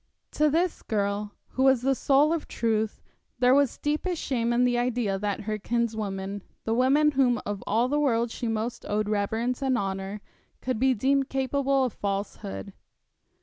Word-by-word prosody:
To 305 Hz, 0 st, +2 dB
this 340 Hz, +4 st, 0 dB
girl, 205 Hz, -1 st, -2 dB
who 260 Hz, -, -3 dB
was 265 Hz, -2 st, +4 dB
the 270 Hz, +1 st, +3 dB
soul 280 Hz, +4 st, +3 dB
of 330 Hz, -, -3 dB
truth, 220 Hz, -2 st, -1 dB, 0.3 s
there 250 Hz, +1 st, +4 dB
was 280 Hz, -2 st, +3 dB
deepest 305 Hz, +4 st, -1 dB
shame 235 Hz, -4 st, -1 dB
in 240 Hz, +1 st, +3 dB
the 245 Hz, -1 st, +2 dB
idea 240 Hz, -5 st, 0 dB
that 205 Hz, -1 st, -2 dB
her 215 Hz, 0 st, -3 dB
kinswoman, 205 Hz, -4 st, -2 dB, 0.2 s
the 225 Hz, -, -1 dB
woman 275 Hz, +5 st, +4 dB
whom 255 Hz, -3 st, +2 dB
of 205 Hz, -1 st, -4 dB
all 230 Hz, +4 st, +2 dB
the 295 Hz, +3 st, +1 dB
world 235 Hz, -5 st, +1 dB
she 235 Hz, -, -4 dB
most 225 Hz, +2 st, -2 dB
owed 210 Hz, 0 st, 0 dB
reverence 220 Hz, +5 st, -1 dB
and 265 Hz, -2 st, +1 dB
honour, 195 Hz, 0 st, -3 dB, 0.4 s
could 255 Hz, -3 st, -2 dB
be 260 Hz, 0 st, +3 dB
deemed 270 Hz, +4 st, +1 dB
capable 270 Hz, 0 st, +1 dB
of 250 Hz, -, -1 dB
falsehood. 195 Hz, -, -4 dB
240 Hz, 170 wpm, -27 LUFS, 210-270 Hz, 0.4 s, was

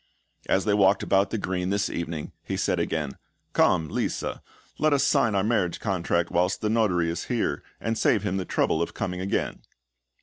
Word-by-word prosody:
As 95 Hz, -, +2 dB
they 105 Hz, -, +2 dB
walked 100 Hz, -1 st, +4 dB
about 100 Hz, 0 st, +3 dB
the 115 Hz, -, -2 dB
green 90 Hz, -2 st, -2 dB
this 100 Hz, 0 st, +1 dB
evening, 85 Hz, -2 st, -4 dB
he -, -, -4 dB
said -, -, 0 dB
again; 75 Hz, -4 st, -2 dB, 0.3 s
"Come, 80 Hz, -, +3 dB
Lisa, -, -, -2 dB, 0.4 s
let 155 Hz, -1 st, +3 dB
us 140 Hz, -, +3 dB
also -, -, +4 dB
sign 105 Hz, -, -1 dB
our 95 Hz, -, +2 dB
marriage 100 Hz, -6 st, +1 dB
contract 85 Hz, -4 st, 0 dB
whilst 90 Hz, +1 st, +1 dB
the 105 Hz, -, 0 dB
Notary 95 Hz, -7 st, +2 dB
is 85 Hz, +1 st, -4 dB
here, 120 Hz, -3 st, -1 dB, 0.2 s
and 115 Hz, 0 st, -1 dB
save 110 Hz, -2 st, +2 dB
him 95 Hz, -2 st, -1 dB
the 95 Hz, -, -2 dB
trouble -, -, +1 dB
of -, -, -3 dB
coming 90 Hz, 0 st, -3 dB
again!" 95 Hz, -, -2 dB
95 Hz, 195 wpm, -26 LUFS, 90-105 Hz, 0.4 s, walked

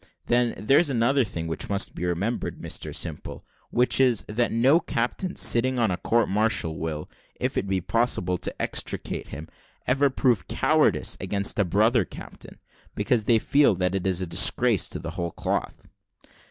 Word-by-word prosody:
Then, 120 Hz, -1 st, +1 dB
there's 140 Hz, +9 st, +3 dB
another 130 Hz, +2 st, +2 dB
thing 85 Hz, -6 st, -5 dB
which 80 Hz, 0 st, -3 dB
must 100 Hz, -1 st, -1 dB
be 90 Hz, -, -4 dB
remembered, 95 Hz, +7 st, -2 dB
Mr -, -, -5 dB
Simple, 80 Hz, -4 st, -6 dB, 0.2 s
which 125 Hz, +1 st, +1 dB
is, 125 Hz, -5 st, +3 dB
that 115 Hz, +3 st, 0 dB
no 130 Hz, +8 st, +4 dB
captains 160 Hz, +6 st, -3 dB
sitting 130 Hz, +2 st, +2 dB
on 115 Hz, -5 st, +2 dB
a 90 Hz, -, -1 dB
court 115 Hz, +4 st, +1 dB
martial 100 Hz, -7 st, 0 dB
will, 75 Hz, -1 st, -4 dB, 0.3 s
if -, -, -2 dB
it 100 Hz, -, -1 dB
be 95 Hz, -1 st, 0 dB
possible 90 Hz, -4 st, 0 dB
to -, -, -4 dB
extricate -, -, -2 dB
him, 75 Hz, +3 st, -8 dB, 0.4 s
ever 140 Hz, +2 st, +2 dB
prove 125 Hz, -5 st, +1 dB
cowardice -, -, +1 dB
against 100 Hz, +1 st, 0 dB
a -, -, +5 dB
brother 110 Hz, +5 st, +3 dB
captain, -, -, -11 dB, 0.4 s
because 115 Hz, -4 st, 0 dB
they 115 Hz, -1 st, +4 dB
feel 140 Hz, 0 st, +3 dB
that 90 Hz, 0 st, -1 dB
it's 95 Hz, -1 st, 0 dB
a -, -, 0 dB
disgrace, 95 Hz, +5 st, +2 dB
to -, -, -5 dB
the -, -, -6 dB
whole 85 Hz, 0 st, -3 dB
cloth." -, -, -3 dB
110 Hz, 165 wpm, -25 LUFS, 90-125 Hz, 0.4 s, a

